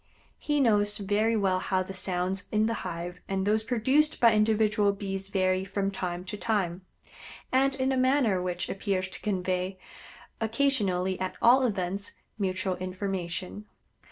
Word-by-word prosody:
He 295 -1 0
knows 205 -5 +3
very 210 +3 +1
well 190 -3 +2
how 185 0 0
the 195 - -8
sounds 185 +1 -1
in 215 0 +2
the 230 - 0
hive 175 0 -5
and 195 0 -1
those 215 +1 +2
produced 260 +7 +2
by 230 -2 +6
individual 215 -1 +3
Bees 195 -1 -5
vary 185 -1 +1
from 195 +1 -2
time 180 -2 -4
to 200 +2 -5
time, 190 -5 -1 0.7
and 270 +1 +3
in 265 0 0
a 265 - +1
manner 255 -7 +3
which 180 0 -2
appears 195 -1 -2
to - - -8
convey, 185 -1 -1 0.6
occasionally 215 -7 +1
at 185 0 -3
all 250 +3 +6
events, 195 -1 -3 0.3
mutual 185 -1 -1
information. 185 +1 -4
195 Hz, 150 wpm, -28 LUFS, 185-220 Hz, 0.7 s, by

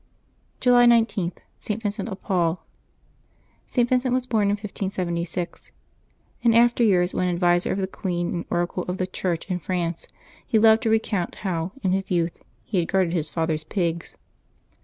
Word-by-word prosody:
July 245 -1 +5
19.— 225 -6 +3 0.3
ST, 215 +1 -3
VINCENT 205 +1 -3
OF 195 -1 -6
PAUL. 175 -3 0 1.0
[t. 245 - +2
Vincent 255 +1 +1
was 255 0 +1
bom 225 -4 +1
in 200 - +2
1576. 185 -4 -3 0.7
In 230 -1 +4
after 240 +1 +4
years, 180 -4 +3
when 180 - 0
adviser 175 0 +2
of - - -1
the 195 - 0
queen 175 -2 -3
and 170 -1 -3
oracle 175 +1 -1
of 180 +1 -2
the 185 - 0
Church 180 -2 -2
in 180 - 0
France, 170 -1 -3 0.4
he 225 - +1
loved 220 0 +6
to 230 - 0
recount 220 -5 0
how, 175 -1 -1
in 190 - +2
his 195 0 -1
youth, 170 -2 -1 0.2
he 195 - -1
had 165 - 0
guarded 185 -3 +1
his 160 -3 -1
father's 160 -2 -1
pigs. 170 -1 -2
185 Hz, 165 wpm, -24 LUFS, 175-220 Hz, 1.0 s, loved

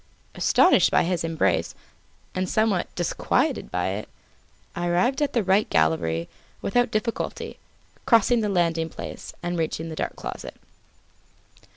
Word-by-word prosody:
Astonished - - +4
by - - +3
his 175 0 -1
embrace, 165 -1 0 0.6
and 185 0 -2
somewhat 215 -5 +1
disquieted 175 -3 0
by 90 +1 -1
it, 100 +3 -4 0.7
I 175 0 -2
arrived 185 - +1
at 290 - +1
the 235 - +2
right 195 +3 +2
gallery 80 +1 +1 0.3
without 245 +4 +1
difficulty, 225 +2 -3 0.5
crossing 230 0 +4
the 210 - 0
landing 165 -3 +1
place, - - -8
and 175 0 -2
reaching 160 0 -2
the 160 - -6
dark - - -3
closet. - - -7
175 Hz, 135 wpm, -25 LUFS, 160-215 Hz, 0.7 s, Astonished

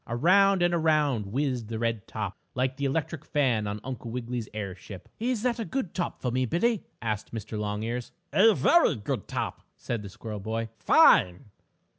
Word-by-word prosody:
Around 185 +9 +4
and 175 0 +2
around 150 -9 +2
whizzed 125 0 -1
the 110 0 -4
red 115 -2 -2
top, 105 -3 -4 0.2
like 130 +1 0
the 140 - -2
electric 155 +2 -2
fan 130 -10 +1
on 100 +1 -3
Uncle 125 -3 -6
Wiggily's 120 -1 -4
airship. 100 -2 -7
"Is 235 -1 -1
that 245 -2 0
a - - -1
good 240 -6 -3
top 180 - -3
for 125 - 0
me, 130 +1 0
Billie?" 215 - +1 0.2
asked 110 -2 -3
Mr. 110 -1 -6
Longears. 110 +3 -3 0.2
"A 220 +1 +6
very 340 - +4
good 110 0 -4
top," - - -3 0.2
said 115 -3 -3
the 100 - -8
squirrel 105 +2 -7
boy. 115 +2 -3
"Fine!" 95 +5 +5
125 Hz, 175 wpm, -27 LUFS, 110-160 Hz, 0.2 s, A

